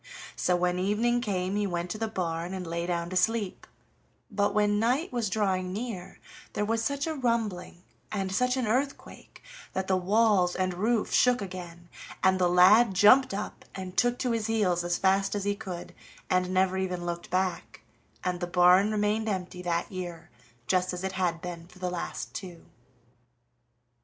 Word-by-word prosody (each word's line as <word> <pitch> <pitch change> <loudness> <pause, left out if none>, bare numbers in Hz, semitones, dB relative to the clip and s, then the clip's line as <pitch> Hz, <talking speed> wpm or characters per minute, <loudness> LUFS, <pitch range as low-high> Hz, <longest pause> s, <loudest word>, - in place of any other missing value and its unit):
So 180 - +1
when 180 0 0
evening 225 +6 +1
came 190 -3 -1
he 205 -1 0
went 175 -1 -3
to 215 - -5
the 225 - -1
barn, 175 -3 -3
and 185 -1 -5
lay 170 +1 -3
down 170 0 -2
to - - -4
sleep, 205 +1 0 0.6
but 205 0 +1
when 205 0 +2
night 255 - 0
was 235 -4 0
drawing 190 -3 0
near 205 -3 -6 0.3
there 210 - -1
was 225 +1 0
such 280 +3 -1
a 320 - -2
rumbling 225 - -2 0.3
and 195 -2 -2
such 250 +6 +1
an 255 - 0
earthquake 260 +6 -3 0.3
that 190 0 -1
the 190 - +2
walls 195 -1 +3
and 185 -1 0
roof 215 +5 0
shook 250 0 +4
again, 175 -3 -8 0.4
and 190 0 +4
the 180 -1 +3
lad 190 +4 +6
jumped 255 +8 +6
up 200 +2 -5
and 185 -1 -7
took 245 0 +2
to 250 - -1
his 225 -2 -1
heels 195 -6 +1
as 175 0 0
fast 195 +1 +2
as 205 - -2
he 205 0 +1
could, 190 -4 -7 0.4
and 185 0 +2
never 190 0 +2
even 180 -2 -3
looked 170 0 -4
back, 185 0 -2 0.4
and 180 -1 -1
the 175 - -3
barn 180 +4 +5
remained 215 +1 0
empty 180 -2 -4
that 175 +2 -2
year 175 -3 -7 0.3
just 185 +2 +1
as 180 +1 -5
it 190 - -1
had 180 -3 -1
been 170 -1 -7
for 180 - -18
the 180 -1 -3
last 175 - -5
two. 175 -3 -8
190 Hz, 180 wpm, -28 LUFS, 180-215 Hz, 0.6 s, lad